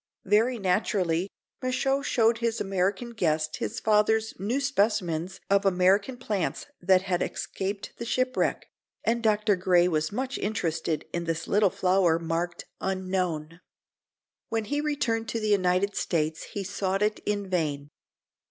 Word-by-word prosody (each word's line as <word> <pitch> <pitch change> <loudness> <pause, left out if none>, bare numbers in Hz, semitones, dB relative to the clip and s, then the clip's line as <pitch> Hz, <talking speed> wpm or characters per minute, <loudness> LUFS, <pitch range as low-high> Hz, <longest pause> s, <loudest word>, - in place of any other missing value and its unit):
Very 220 +5 +3
naturally 185 -2 +1 0.3
Michaux 270 +2 +1
showed 230 -4 +2
his 230 -1 0
American 195 +4 -1
guest 155 -7 0
his 225 - -3
father's 220 +1 +2
new 225 +8 0
specimens 200 - 0
of 200 0 +3
American 195 +6 +3
plants 210 -8 -2 0.2
that 185 +1 +4
had 180 -2 -1
escaped 195 +1 -4
the 235 - -5
shipwreck, 255 +2 0 0.4
and 235 +1 +1
Dr. 215 -1 +3
Gray 180 -1 +3
was 155 -2 0
much 260 +5 -3
interested 165 -6 -1
in 170 0 -2
this 165 -1 -2
little 205 -1 +4
flower, 180 -3 +2
marked 170 +1 -3
"Unknown." 185 -4 -2 0.9
When 225 -1 -1
he 290 +5 -1
returned 235 -7 -1
to 230 - -1
the 215 -1 -1
United 190 0 +2
States 155 -2 -1
he 200 - -3
sought 195 +1 -1
it 210 0 0
in 205 -1 -1
vain. 150 -5 -2
195 Hz, 140 wpm, -27 LUFS, 175-220 Hz, 0.9 s, that